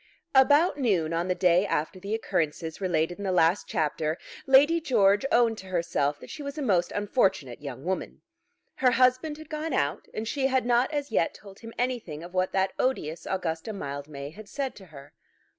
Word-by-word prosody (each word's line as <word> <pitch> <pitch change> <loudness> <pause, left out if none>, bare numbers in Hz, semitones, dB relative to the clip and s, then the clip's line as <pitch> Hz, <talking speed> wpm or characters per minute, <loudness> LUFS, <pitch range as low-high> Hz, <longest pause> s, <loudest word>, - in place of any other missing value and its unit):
About 290 +4 +5
noon 180 - +1
on 170 +2 -1
the 180 - 0
day 180 0 +4
after 185 -1 -2
the 200 +3 -3
occurrences 160 -5 -2
related 175 -1 0
in - - -5
the 190 - 0
last 175 +1 +3
chapter 155 0 -1 0.3
Lady 290 +5 +6
George 210 -4 +3
owned 230 -2 +3
to 190 - -10
herself 165 -5 0
that - - -11
she 310 - -7
was 280 +1 -6
a - - -3
most 185 -8 +2
unfortunate 195 - 0
young 140 0 -7
woman. 185 +1 -3 0.5
Her 255 -2 +3
husband 255 +5 +2
had 310 -1 -11
gone 310 +1 -4
out, 140 +1 -1
and 220 +1 -4
she 265 +2 0
had 260 -2 +1
not 245 +3 +2
as 290 -4 -3
yet 165 - +1
told 195 -2 -14
him 230 -1 -9
anything 235 -12 -2
of 175 +1 -10
what 185 0 +1
that 190 0 +1
odious 170 -11 -1
Augusta 180 +2 -2
Mildmay 140 -4 -6
had 210 +4 -12
said 275 -2 -3
to 195 - -12
her. 140 -3 -13
195 Hz, 195 wpm, -27 LUFS, 165-255 Hz, 0.5 s, Lady